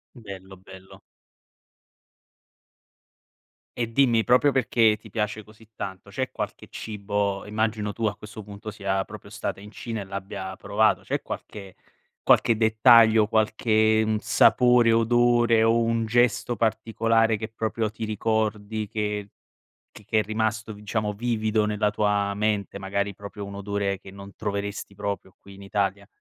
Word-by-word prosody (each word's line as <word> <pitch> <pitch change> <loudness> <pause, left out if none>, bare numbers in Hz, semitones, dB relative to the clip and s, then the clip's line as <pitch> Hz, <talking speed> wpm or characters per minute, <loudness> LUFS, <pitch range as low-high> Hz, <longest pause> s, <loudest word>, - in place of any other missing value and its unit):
Bello, 95 -5 -10
bello. 95 0 -14 2.8
E 115 -1 -1
dimmi 120 -3 +3
proprio 125 +5 +4
perché 115 -4 +3
ti 110 - -16
piace 105 -1 -2
così 110 +1 -19
tanto, 95 +1 -7
c'è 130 +5 -3
qualche - - -5
cibo- 100 -2 -3
immagino 105 0 -1
tu 115 +2 -3
a 105 - -2
questo 105 +1 -10
punto 105 +1 -9
sia 95 -1 -2
proprio - - -11
stata - - -4
in 105 +1 -11
Cina 110 0 -6
e - - -5
l'abbia 95 -1 -6
provato- 105 +3 +1
c'è - - -2
qualche 100 -3 -8 0.5
qualche 115 - +4
dettaglio, 110 0 +6
qualche, 110 0 +2
mhmm, 110 0 0
sapore, 120 +2 +4
odore 120 0 +3
o 115 +1 +4
un 115 -1 0
gesto 120 +1 +2
particolare 115 0 +1
che 110 +2 -5
proprio 110 0 -2
ti 110 +1 -7
ricordi 110 0 -1
che 105 -1 -3 0.6
che 105 - -15
che 110 - +2
è - - +1
rimasto 110 +1 -2
diciamo 105 0 -3
vivido 110 0 0
nella 105 0 +1
tua 105 -1 0
mente, 105 -1 -1
magari 100 +1 -2
proprio 100 +1 -9
un 100 0 -8
odore 100 -1 -2
che 95 - -13
non 100 0 -11
troveresti 100 -1 -4
proprio 100 -1 -5
qui 100 0 -15
in 100 - -12
Italia? 100 0 -2
105 Hz, 145 wpm, -25 LUFS, 100-110 Hz, 2.8 s, dettaglio